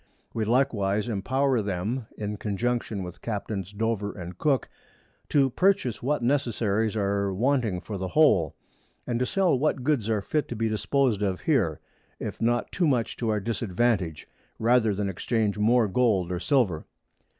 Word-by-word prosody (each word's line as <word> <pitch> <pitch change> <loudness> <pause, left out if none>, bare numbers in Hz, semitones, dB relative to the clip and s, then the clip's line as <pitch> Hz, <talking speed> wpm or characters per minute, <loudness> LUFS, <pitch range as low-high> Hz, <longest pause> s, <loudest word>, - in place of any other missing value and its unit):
We 110 -1 -1
likewise 105 -4 +1
empower 130 +4 +1
them, 105 +5 -3
in 105 0 -4
Conjunction 110 -1 -2
with 90 -1 -9
Captains_ 100 -3 -4
Dover 110 -2 -1
and 90 -1 -8
Cook 140 - +1 0.6
_, - - -39
to 135 -3 +3
purchase 185 - +1
what 145 0 0
Necessaries 115 -5 +1
are 100 -1 0
wanting 115 -2 +1
for 100 0 -6
the 95 - -2
Whole, 95 - +3 0.5
and 120 -1 -1
to 125 - 0
sell 185 -9 +2
what 140 -3 0
Goods 130 -6 +1
are 105 -3 0
fit 150 +6 -1
to 120 - -5
be 115 0 0
dispos'd 115 0 +1
of 95 -3 -1
here, - - +1 0.4
if - - -6
not 120 +1 +1
too 175 -3 +1
much 120 -5 0
to 115 - -1
our 105 -1 +1
Disadvantage, 100 -5 -1 0.3
rather 115 -2 +3
than 100 0 -1
exchange 105 +2 -1
more 115 +1 +4
Gold 100 -4 +1
or 90 - -2
Silver. 110 - +1
110 Hz, 160 wpm, -26 LUFS, 100-125 Hz, 0.6 s, more